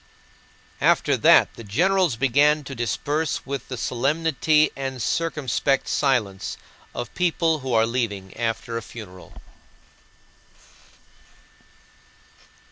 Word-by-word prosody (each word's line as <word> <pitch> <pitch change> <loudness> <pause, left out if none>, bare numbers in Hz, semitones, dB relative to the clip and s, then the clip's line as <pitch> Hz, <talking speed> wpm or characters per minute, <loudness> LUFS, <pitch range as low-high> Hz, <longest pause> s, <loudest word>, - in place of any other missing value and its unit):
After - - +3
that - - +5
the 115 - -11
generals 175 - +2
began 145 +5 +3
to 135 - -8
disperse 145 +6 -2
with 140 0 -5
the 125 - -5
solemnity 150 +5 +1
and 135 -1 -4
circumspect 135 -1 0
silence 115 -9 0 0.4
of 120 - -5
people 165 -2 +1
who 130 -1 -5
are 110 0 +4
leaving, 105 -6 -3
after 115 0 -3
a - - -4
funeral. 105 -5 -12
135 Hz, 100 wpm, -23 LUFS, 115-150 Hz, 0.4 s, that